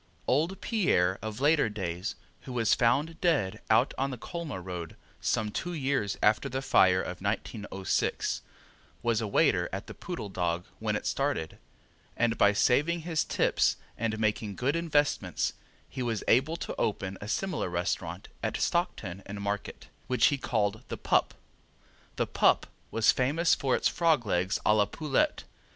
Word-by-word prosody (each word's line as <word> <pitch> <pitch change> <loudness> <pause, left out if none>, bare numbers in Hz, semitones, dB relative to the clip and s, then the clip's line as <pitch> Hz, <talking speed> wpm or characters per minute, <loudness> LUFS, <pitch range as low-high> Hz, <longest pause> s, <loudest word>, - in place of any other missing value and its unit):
Old 165 +9 +1
Pierre 95 - +2
of 110 +2 -5
later 145 -3 +4
days, 95 -2 -4 0.3
who 130 - -8
was 115 -3 +3
found 145 +7 +1
dead 125 - +1
out 115 +5 +4
on 135 +1 +1
the 130 - -5
Colma 165 - -5
road 90 -3 -6 0.2
some 105 -1 0
two 175 +11 -3
years 135 -9 -1
after 110 +6 +3
the 130 +1 -3
fire 95 -7 +5
of 90 0 -6
1906, 100 -2 -1 0.6
was 115 -1 +1
a 110 - -2
waiter 100 - +2
at - - -4
the - - -9
Poodle 105 - -6
Dog 90 -2 -1
when - - -1
it - - -3
started, 80 -1 -1 0.6
and 115 -1 +2
by 100 - +5
saving 150 +11 +2
his 160 -1 0
tips - - +2 0.2
and 110 -1 -1
making 110 -1 -1
good 135 - 0
investments 150 -4 +1 0.3
he 130 - -6
was 115 -4 -1
able 140 +8 +3
to - - -5
open 100 -2 -1
a 100 - -6
similar 175 - -1
restaurant 85 0 -2
at - - -1
Stockton 100 - -1
and 100 0 -6
Market, 100 0 -4 0.2
which 125 - +3
he - - 0
called 110 -3 0
the - - -5
Pup. - - +1 0.8
The - - +1
Pup - - +3 0.2
was 115 -1 +4
famous 155 +7 +2
for 135 -2 +1
its - - +2
frogs' 160 -8 +2
legs 95 0 +1
a 105 - +5
la 105 -1 +4
poulette. 150 -4 0
115 Hz, 160 wpm, -29 LUFS, 100-145 Hz, 0.8 s, fire